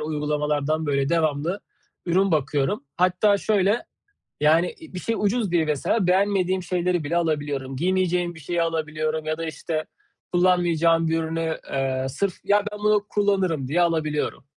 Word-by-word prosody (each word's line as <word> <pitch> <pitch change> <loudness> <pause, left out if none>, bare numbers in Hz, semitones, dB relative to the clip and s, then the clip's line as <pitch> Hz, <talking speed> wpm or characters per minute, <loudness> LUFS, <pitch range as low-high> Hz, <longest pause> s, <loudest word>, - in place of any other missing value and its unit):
uygulamalardan 150 0 -1
böyle 140 -1 +1
devamlı 165 +3 0 0.5
ürün 190 +3 +2
bakıyorum. 145 +4 0
Hatta 185 +3 +3
şöyle; 205 +1 +1 0.6
yani, 165 +4 +3
iii, 320 - -13
bir 180 - -4
şey 230 +3 -2
ucuz 210 -1 0
diye 165 -2 +2
mesela 165 +7 0
beğenmediğim 190 -1 +2
şeyleri 180 -2 0
bile 170 +4 -1
alabiliyorum. 145 -5 -2
Giymeyeceğim 180 +1 0
bir - - -11
şeyi 170 +3 -2
alabiliyorum 155 -1 -2
ya 155 0 -2
da, 165 - -4
işte, 160 0 -4 0.5
kullanmayacağım 170 -2 +3
bir 165 0 +1
ürünü, 160 0 -2
ııı, 135 -1 -1
sırf, 195 +6 -1
"Ya, 205 0 +3
ben 210 - -7
bunu 210 -1 +2
kullanırım." 190 -9 +1
diye 170 +5 +1
alabiliyorum. 155 -5 -1
165 Hz, 150 wpm, -24 LUFS, 155-185 Hz, 0.6 s, Hatta